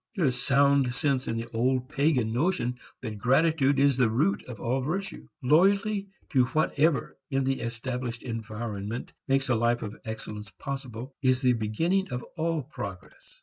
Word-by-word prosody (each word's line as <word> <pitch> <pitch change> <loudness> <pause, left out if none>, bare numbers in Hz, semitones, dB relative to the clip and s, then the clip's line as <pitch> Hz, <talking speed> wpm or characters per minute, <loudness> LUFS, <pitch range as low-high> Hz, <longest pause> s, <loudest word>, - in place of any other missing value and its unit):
There 180 -6 +1
is 125 -2 +1
sound 140 -2 +3
sense 135 0 0
in 115 - -1
the 115 - -3
old 125 +2 +1
pagan 135 -6 +1
notion 125 -4 0 0.2
that 110 -4 -5
gratitude 140 +3 +3
is 140 -1 +4
the 125 -4 +4
root 150 - +1
of 120 -4 -8
all 130 +3 0
virtue. 185 +9 -3 0.2
Loyalty 195 - +3 0.2
to 130 -4 +4
whatever 155 +1 +1
in 135 -2 +1
the 135 0 0
established 120 +1 -4
environment 110 -1 -5
makes 135 0 +2
a 125 - +4
life 120 +1 +1
of 105 +1 -5
excellence 110 -2 -6
possible 130 +4 -6
is 130 -1 +3
the 125 -2 +4
beginning 165 - 0
of 125 -2 -4
all 165 -2 0
progress. 100 -9 -9
130 Hz, 160 wpm, -28 LUFS, 115-145 Hz, 0.2 s, is